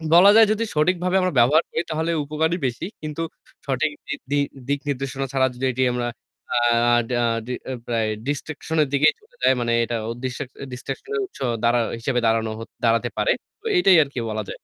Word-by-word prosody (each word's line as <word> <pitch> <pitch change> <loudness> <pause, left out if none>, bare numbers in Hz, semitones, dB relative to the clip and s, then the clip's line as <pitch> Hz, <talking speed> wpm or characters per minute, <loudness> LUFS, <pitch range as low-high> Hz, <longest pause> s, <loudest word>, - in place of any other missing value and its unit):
বলা 195 +4 +9
যায় 225 0 +8
যদি 220 +1 0
সঠিকভাবে 180 +4 +2
আমরা 185 -3 0
ব্যবহার 150 +8 +5
করি 160 - -1
তাহলে 160 +2 -1
উপকারই 160 +4 0
বেশি। 120 +7 -4 0.2
কিন্তু 155 +1 -4 0.4
সঠিক 140 +3 0 0.2
বৃদ্ধি 145 0 -3 0.3
দিক 140 0 0
নির্দেশনা 135 0 -2
ছাড়া 130 -1 +3
যদি 130 +2 -3
এটি 130 +1 +1
আমরা 120 -1 -1 0.5
আ - - +4 0.5
ডা 120 -1 +1 0.3
ডি 125 - -3
অ্যা 130 - -4
প্রায় 115 -2 0 0.2
ডিস্ট্রাক্শন 155 +2 -3
এর - - -3
দিকেই 150 +2 +5
চলে 485 +3 -26
যায় 130 - +5
মানে 120 0 0
এটা 120 0 -2 0.3
ডিস্ট্রাক 130 +1 -4 0.2
ডিস্ট্রাক্শন 135 - -7
এর 420 - 0
উৎস 385 - -16 0.2
দাড়া 120 +1 +4 0.2
হিসেবে 125 +1 0
দাঁড়ান 115 0 +3 0.4
দাঁড়াতে 115 +1 +2
পারে। - - +2 0.3
তো - - -26
এটাই 190 - +6
আরকি 140 -3 -6
বলা 110 0 -2
যায়। - - -5
140 Hz, 185 wpm, -23 LUFS, 125-160 Hz, 0.5 s, বলা